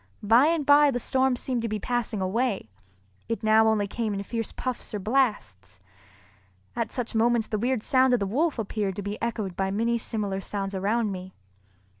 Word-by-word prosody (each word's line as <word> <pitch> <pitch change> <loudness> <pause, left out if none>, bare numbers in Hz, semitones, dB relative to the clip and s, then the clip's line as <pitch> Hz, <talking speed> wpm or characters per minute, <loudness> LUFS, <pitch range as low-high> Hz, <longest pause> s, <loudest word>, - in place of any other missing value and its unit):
By 230 +7 +5
and 325 -3 +1
by 290 +1 +6
the 255 - -1
storm 260 +1 +1
seemed 245 -1 -2
to 230 - -2
be 215 - -2
passing 235 -2 -2
away, 195 - -1 0.6
it 230 0 -3
now 220 +1 +5
only 215 -2 +2
came 215 0 -3
in 200 - -3
fierce 225 +1 -4
puffs 255 -4 -4
or - - -2
blasts. 200 - -1 1.0
At 230 -1 -2
such 245 -2 -3
moments 230 0 +2
the 215 - -1
weird 245 0 0
sound 260 -1 +4
of - - -1
the 200 - -1
wolf 285 - 0
appeared 205 -3 -2
to 205 - -5
be 205 +2 -5
echoed 215 -6 -3
by 190 +1 -1
many 230 +4 0
similar 205 -4 -2
sounds 195 0 -4
around 210 +3 0
me. 185 0 -8
220 Hz, 190 wpm, -26 LUFS, 200-245 Hz, 1.0 s, by